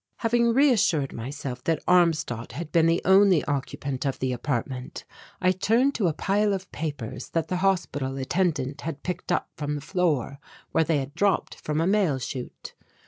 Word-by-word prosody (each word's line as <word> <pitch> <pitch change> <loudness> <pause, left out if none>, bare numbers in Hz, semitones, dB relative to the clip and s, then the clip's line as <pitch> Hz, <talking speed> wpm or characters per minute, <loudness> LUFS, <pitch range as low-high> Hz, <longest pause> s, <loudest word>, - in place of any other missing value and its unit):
Having 235 0 +2
reassured 215 - +3
myself 130 +1 -6
that 165 -2 0
Armstadt 160 -11 +2
had 155 +3 -6
been 165 -1 +4
the 165 +1 +2
only 190 -3 +5
occupant 140 -1 -3
of 135 -2 -1
the 130 -1 -1
apartment, 125 0 -4 0.3
I 185 -1 +3
turned 225 +9 +2
to 205 -8 +1
a 160 - +1
pile 205 +5 +1
of 190 -1 -5
papers 145 -8 -5
that 165 -1 -1
the 180 - 0
hospital 170 -8 0
attendant 140 -2 -1
had 155 -2 -5
picked 180 0 -4
up - - 0
from 150 0 -3
the - - -3
floor 150 - -1 0.3
where 160 - +3
they 160 -1 +1
had 140 0 -4
dropped 200 +4 +1
from 150 0 -2
a 165 - +2
mail 190 -7 +2
chute. 125 0 -7
160 Hz, 175 wpm, -26 LUFS, 140-190 Hz, 0.3 s, only